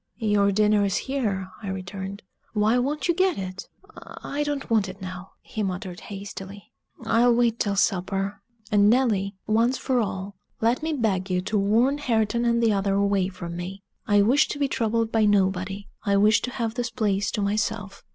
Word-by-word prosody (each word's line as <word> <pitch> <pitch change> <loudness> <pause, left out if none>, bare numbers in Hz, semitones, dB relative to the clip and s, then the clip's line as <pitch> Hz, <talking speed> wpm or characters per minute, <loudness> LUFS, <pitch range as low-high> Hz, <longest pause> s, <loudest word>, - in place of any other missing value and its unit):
"Your 205 -3 +2
dinner 210 0 +3
is 195 -2 +1
here," 210 -9 -2
I 205 - -7
returned: 190 +1 -6 0.3
"why 215 +3 +3
won't 290 +6 -1
you 345 - +3
get 370 +1 +2
it?" 185 0 -6 0.5
"I 290 - -3
don't 290 -1 -2
want 215 -5 +2
it 185 +1 -9
now," 185 0 -8
he 215 - -5
muttered 185 -2 -4
hastily. 200 0 -9 0.3
"I'll 235 +1 +4
wait 235 -1 +2
till 200 -1 0
supper. 195 0 0 0.3
And, 205 0 +5
Nelly, 210 -5 +2
once 230 +4 +2
for 255 0 0
all, 200 -2 -3 0.3
let 230 +4 +1
me 320 +1 -1
beg 200 -8 0
you 180 0 +1
to 215 - -3
warn 235 +8 +2
Hareton 235 -3 +1
and 235 0 +2
the 225 -2 +4
other 195 0 +1
away 200 -2 +2
from 175 -3 -7
me. 185 +3 -6 0.2
I 205 -1 +5
wish 260 +8 +4
to - - -4
be 285 -1 +1
troubled 230 -3 0
by 225 -2 +3
nobody 195 0 +1 0.2
I 200 -1 +2
wish 210 +1 +4
to - - -3
have 230 -3 -3
this 245 0 -2
place 205 -5 0
to 210 - -1
myself." 205 -1 -2
205 Hz, 185 wpm, -25 LUFS, 195-235 Hz, 0.5 s, And